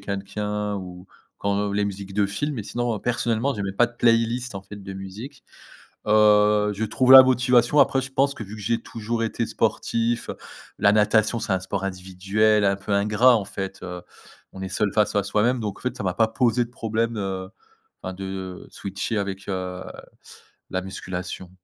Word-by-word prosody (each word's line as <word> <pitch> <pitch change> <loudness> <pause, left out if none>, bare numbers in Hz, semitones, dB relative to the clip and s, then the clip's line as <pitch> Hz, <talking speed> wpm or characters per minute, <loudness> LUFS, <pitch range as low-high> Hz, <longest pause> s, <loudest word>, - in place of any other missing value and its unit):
quelqu'un, 105 +1 -3
ou, 90 -1 -9 0.3
quand 100 0 -1
les 105 0 +1
musiques 100 -1 -6
de 105 - +2
film. 105 +10 -2
Mais 110 - -4
sinon, 120 0 -2
personnellement, 120 +2 0
j'ai 100 - -4
même 95 0 -4
pas 120 - +5
de 120 0 -16
playlist, 115 0 +2
en 95 - -6
fait, 105 - -11
de 95 -1 -8
musique. 105 +9 -9 0.6
Heu, 105 0 +4
je 105 - -3
trouve 125 +4 +2
la 130 0 +13
motivation, 125 +1 +3
après, 135 -1 +4
je 135 - -7
pense 140 +1 +2
que, - - -6
vu 105 +1 -10
que 105 - -9
j'ai 115 +3 0
toujours 115 +1 -3
été 115 +1 -1
sportif. 115 0 -1 0.5
La 100 - +4
natation, 110 +2 +3
c'est 95 - -1
un 95 - +1
sport 95 +1 -4
individuel, 95 +3 +1
un 100 - +3
peu 100 +2 -7
ingrat 105 +5 +4
en 100 - -4
fait, 95 0 -6
heu. 90 -1 -6 0.5
On 95 - -10
est 95 - -4
seul 100 +2 0
face 105 0 +2
à 100 - +2
soi-même 110 +5 +1
donc, 105 -3 -4
en - - -17
fait 125 0 -3
ça 125 - -5
m'a 90 -2 0
pas 115 +3 +3
posé 120 +1 +1
de 115 - -11
problème, 115 -1 -2
heu, 95 -2 -4 0.5
enfin 95 - -4
de, 95 +1 -8
heu, 95 -1 -6
de - - -18
switcher 100 +3 -4
avec, 100 -1 -4
heu, 90 -1 -4 0.9
la 95 - -1
musculation. 95 -1 -6
105 Hz, 195 wpm, -24 LUFS, 95-115 Hz, 0.9 s, la